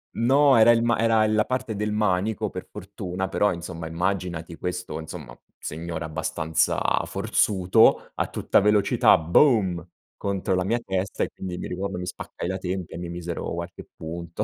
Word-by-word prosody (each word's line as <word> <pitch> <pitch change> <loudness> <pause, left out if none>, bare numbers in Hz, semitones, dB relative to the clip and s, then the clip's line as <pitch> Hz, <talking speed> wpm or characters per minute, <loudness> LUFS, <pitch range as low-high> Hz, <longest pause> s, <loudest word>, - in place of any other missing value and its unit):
No, 135 +3 +4
era 115 +1 +7
il 115 0 +3
ma 120 -1 +2
era 115 -1 +3
la 110 0 +2
parte 130 -4 -2
del 105 +1 -2
manico, 105 0 0
per - - -7
fortuna, 95 -1 -5
però, 105 +1 +1
insomma, 85 -1 -7
immaginati 85 -1 -3
questo, 90 -3 -4
insomma, 80 - -9 0.2
signore 80 +1 -5
abbastanza 80 +1 -1 0.2
forzuto 95 +2 +2
a - - -1
tutta - - +2
velocità, 105 0 +4
boom! 90 - +3 0.3
Contro 100 -1 -1
la 90 - +1
mia 120 +4 +1
testa 95 0 -2
e - - -2
quindi, 90 -2 -6
mi - - -5
ricordo 95 0 -4
mi 90 - -4
spaccai 90 - -6
la 95 +1 -2
tempia 90 -2 -4
e - - -6
mi 85 -1 -5
misero 85 -1 -4
qualche 85 +1 -6
punto. 85 +1 -5
95 Hz, 165 wpm, -25 LUFS, 85-105 Hz, 0.3 s, era